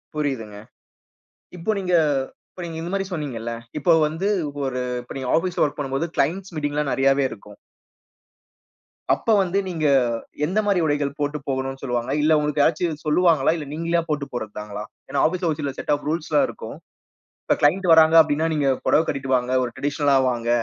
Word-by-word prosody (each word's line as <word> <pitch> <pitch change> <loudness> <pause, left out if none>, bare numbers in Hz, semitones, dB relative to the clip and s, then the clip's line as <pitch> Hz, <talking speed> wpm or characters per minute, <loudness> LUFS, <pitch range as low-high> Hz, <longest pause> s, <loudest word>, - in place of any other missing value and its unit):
புரியுதுங்க. 130 -9 -3 1.0
இப்போ 170 +5 -2
நீங்க 180 -1 -1 0.6
இப்ப 180 - -9
நீங்க 165 -1 -6
இந்த 170 +2 -5
மாரி 195 -1 0
சொன்னீஙகல்ல. 125 -9 -4 0.3
இப்போ 170 +3 +3 0.2
வந்து 170 +6 -2 0.4
ஒரு 130 -1 -2 0.2
இப்ப 120 - -10
நீங்க 130 -1 -4
ஆபீஸ்ல 180 +1 0
வொர்க் 145 - -3
பண்ணும்போது 135 +3 -2
கிளையன்ட்ஸ் 180 +5 -1
மீட்டிங் 145 -1 -2
எல்லாம் 150 -2 0
நிறையாவே 135 +1 +3
இருக்கும். 105 -1 -12 1.6
அப்ப 225 - +1
வந்து 185 +1 -1
நீங்க, 165 -4 -2 0.6
எந்த 190 +7 0
மாரி 200 -3 +2
உடைகள் 145 -1 -1
போட்டு 145 +1 -1
போகணும்னு 135 0 -3
சொல்லுவாங்க. 120 -2 -2
இல்ல 155 +1 +4
உங்களுக்கு 150 0 0
யாராச்சும் 160 -1 0
சொல்லுவாங்களா? 155 -3 +3
இல்ல 150 - -6
நீங்களே 170 +2 0
போட்டு 150 -2 -1
போறது 110 -3 -4
தாங்களா? 105 0 -6 0.3
ஏனா, - - 0
ஆபீஸ்ல 175 -1 -1
சில 140 -2 -2
செட் - - -3
ஆஃப் 145 - -9
ரூல்ஸ் 160 0 -2
எல்லாம் 150 - +4
இருக்கும். - - -8 0.7
இப்ப - - +2
கிளையன்ட் 180 +6 +3
வராங்க 160 0 +6
அப்டினா 155 +1 0
நீங்க 145 -3 +1 0.2
புடவ - - +4
கட்டிட்டு 135 -1 -2
வாங்க, 125 0 -1
ஒரு 120 - -3
டிரடிஷனல்ல 145 -1 +1 0.2
வாங்க. 120 -1 -3
150 Hz, 170 wpm, -23 LUFS, 135-165 Hz, 1.6 s, வராங்க